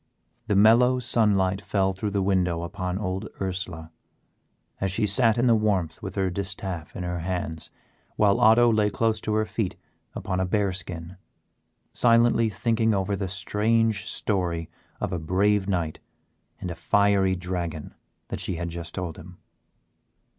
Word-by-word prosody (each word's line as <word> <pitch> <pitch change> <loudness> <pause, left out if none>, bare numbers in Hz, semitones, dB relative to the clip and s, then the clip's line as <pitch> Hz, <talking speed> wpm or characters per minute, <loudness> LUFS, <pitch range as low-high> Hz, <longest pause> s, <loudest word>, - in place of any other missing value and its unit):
The 105 - +1
mellow 115 +5 +5
sunlight 105 -6 +2
fell 95 -1 0
through 100 +3 -3
the 100 -1 0
window 90 -3 +1
upon 90 0 -3
old 95 -2 -3
Ursela, 90 -4 -4 0.9
as 95 -1 0
she 105 +3 +1
sat 110 +2 +3
in 120 - +2
the 120 - +5
warmth 100 -7 0
with 95 -2 -6
her 95 -2 0
distaff 95 -3 -5
in 90 - -4
her 90 0 -3
hands 85 -2 -4 0.5
while 100 -2 +3
Otto 115 +2 +6
lay 105 -1 +2
close 110 +1 0
to 105 - -1
her 110 0 +2
feet 105 -4 -3 0.4
upon 95 -1 -3
a 95 - +1
bear 100 0 +1
skin, 90 0 -6 0.8
silently 115 -1 +4
thinking 110 0 +1
over 100 +1 0
the 95 -1 -3
strange 105 +2 0
story 85 -5 -2 0.3
of - - -2
a 90 - -1
brave 95 +4 +1
knight 85 -5 -1 0.6
and 90 - -4
a - - -5
fiery 95 +2 +2
dragon 85 -4 -4 0.4
that - - -4
she 95 - -1
had 85 +1 -4
just 85 0 -7
told 90 -4 -4
him. 90 +2 -12
95 Hz, 155 wpm, -25 LUFS, 90-105 Hz, 0.9 s, Otto